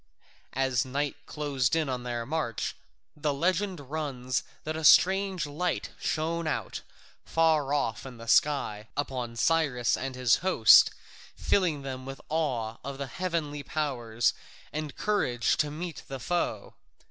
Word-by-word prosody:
As 130 -2 +2
night 140 +2 -2
closed 140 -3 0
in 160 -2 +1
on 130 -2 -2
their 120 -1 -3
march, 145 -6 -2 0.4
the 150 0 -1
legend 185 +5 0
runs 135 -3 -3 0.2
that 155 +1 -3
a 160 - -4
strange 190 +2 +5
light 165 +5 -2
shone 165 +1 -1
out, 155 - -3 0.4
far 160 -4 +2
off 115 -7 0
in 130 -3 -9
the 115 0 -10
sky, 115 -6 +2
upon 125 -5 -3
Cyrus 140 -4 +2
and 130 0 -4
his 125 -2 +4
host, 180 -12 +7 0.5
filling 165 -8 +1
them 130 -1 -6
with 135 0 -7
awe 125 -9 -1
of 140 0 -5
the 140 - -3
heavenly 155 -1 -3
powers 120 -7 0 0.4
and 150 -2 -4
courage 125 - +1
to 150 - +1
meet 165 +2 -6
the 135 -1 -6
foe. 175 +6 -2
145 Hz, 140 wpm, -28 LUFS, 125-160 Hz, 0.5 s, host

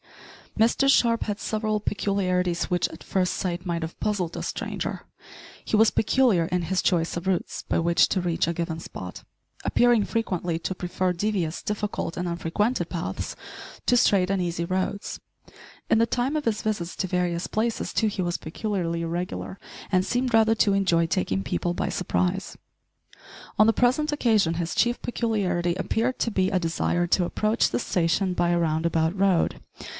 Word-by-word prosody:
Mr 235 +5 +4
Sharp 235 -4 +4
had 205 -1 -3
several 215 -1 -1
peculiarities, 185 -4 0
which, 180 -2 0
at 160 - -11
first 185 -2 0
sight, 180 -1 -3
might 170 -2 -2
have 160 - -6
puzzled 195 -6 -1
a - - -4
stranger. - - -4 0.6
He - - -1
was 220 0 +5
peculiar 220 -6 +3
in 180 +1 -1
his 185 +2 0
choice 170 -3 +1
of 170 +1 -4
routes 185 -2 -1
by - - +2
which 170 +1 +3
to 190 - +1
reach 170 -2 0
a 170 - 0
given 165 -1 -3
spot - - -8 0.4
appearing 240 -3 +4
frequently 180 -7 -1
to 185 +3 -3
prefer 180 0 -1
devious, 180 -3 -1
difficult, 210 -4 -3
and 180 0 -2
unfrequented 175 +8 -1
paths - - -4 0.5
to 245 - +4
straight 195 -6 +4
and 195 -1 +1
easy 170 -1 -2
roads. 185 +3 -2 0.7
In 225 - +4
the 230 - +3
time 250 +5 0
of 300 - -1
his 225 -2 0
visits 195 -5 -2
to 190 - -1
various 175 -1 -1
places, 225 +1 -1
too, 220 - +2
he 205 -3 -2
was 175 0 -1
peculiarly 170 -1 -3
irregular, 175 +3 -4 0.3
and 185 -1 +3
seemed 245 +2 0
rather 225 0 +5
to 210 -2 +3
enjoy 175 -4 +3
taking 130 - -1
people 95 - -1
by - - -2
surprise. 185 +2 -1 1.0
On 215 - +6
the - - +6
present 255 +7 +2
occasion 220 - +2
his 170 0 -3
chief 240 +1 +2
peculiarity 195 -8 0
appeared 225 +7 -1
to 230 - 0
be 190 -2 +1
a 190 - +1
desire 175 +1 0
to 180 - +3
approach 215 +5 +1
the - - -1
station 180 -2 +1
by 175 -1 +1
a 175 0 +2
round 160 -1 0
about 165 +2 +1
road. 190 -3 +2
185 Hz, 175 wpm, -25 LUFS, 170-215 Hz, 1.0 s, On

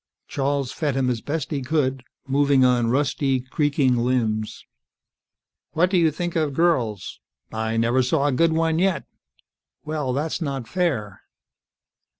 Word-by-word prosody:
Charles 140 -1 -1
fed 145 -4 -2
him 130 -2 +1
as 115 -2 -3
best 150 0 -3
he 140 -3 -1
could, 130 -2 -1 0.2
moving 140 -1 +3
on 120 -2 +2
rusty, 135 0 +1
creaking 135 -1 +1
limbs. 115 -3 -1 1.1
"What 175 +4 +2
do 190 - +3
you 165 -2 +4
think 175 +3 -4
of 155 -4 0
girls?" 125 - 0 0.3
"I 110 0 -2
never 120 +3 +2
saw 140 +3 +1
a 145 - +2
good 165 +5 +3
one 160 0 +1
yet." 190 0 +1 0.8
"Well, 150 -4 -2
that's 150 +6 -2
not 135 -6 -3
fair." 135 - -2
140 Hz, 145 wpm, -23 LUFS, 125-155 Hz, 1.1 s, you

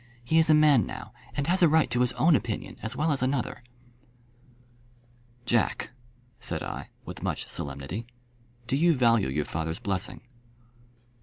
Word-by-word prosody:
He 160 +7 +3
is 160 - +4
a 155 - +7
man 150 -5 +5
now, - - -8 0.2
and 140 - -1
has 185 +4 +2
a 170 - +7
right 160 +1 +4
to 120 - +1
his 125 - +3
own 165 -1 +4
opinion 115 -5 -3
as 115 +2 -4
well 155 +3 +1
as 140 - 0
another." 130 -1 -1 1.8
"Jack," 120 -1 +1 0.5
said 85 -9 -3
I, - - -6 0.2
with - - -8
much - - -2
solemnity, 70 +11 -5 0.6
"do 125 - 0
you 165 +3 +4
value 115 - +3
your 75 +2 -1
father's 80 +1 -3
blessing?" 100 -2 -3
125 Hz, 155 wpm, -27 LUFS, 100-155 Hz, 1.8 s, a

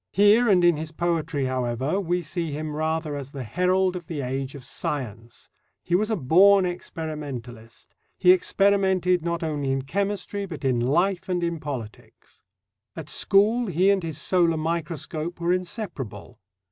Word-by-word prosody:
Here 210 +4 +5
and 180 -3 +4
in 175 -3 +4
his 155 0 -5
poetry, 165 -4 -1
however, 130 +6 -1
we 175 -2 -1
see 165 0 -3
him 150 +1 -4
rather 155 -1 -1
as 140 -2 -6
the 140 -2 -6
herald 180 - +1
of 175 -3 -7
the 155 -4 -4
age 135 +1 -3
of 140 - -9
science: 115 -5 -5 0.4
he 175 - -4
was 210 +5 +2
a 220 - +1
born 190 +6 +5
experimentalist; 140 -10 -7 0.2
he 180 - +6
experimented, 190 -2 +2
not 170 0 -2
only 145 -4 -1
in 135 0 -1
chemistry, 200 +4 -2
but 160 -6 -7
in 125 -3 +2
life 175 +10 +1
and 175 -1 0
in 170 -1 -1
politics. 130 -8 -8 0.5
At 160 -2 -7
school, 220 +4 +3
he 185 +2 +3
and 195 -1 +1
his 160 -4 -5
solar 170 0 +2
microscope 165 +1 -3
were 170 +1 +1
inseparable. 160 - -5
165 Hz, 160 wpm, -25 LUFS, 140-185 Hz, 0.5 s, he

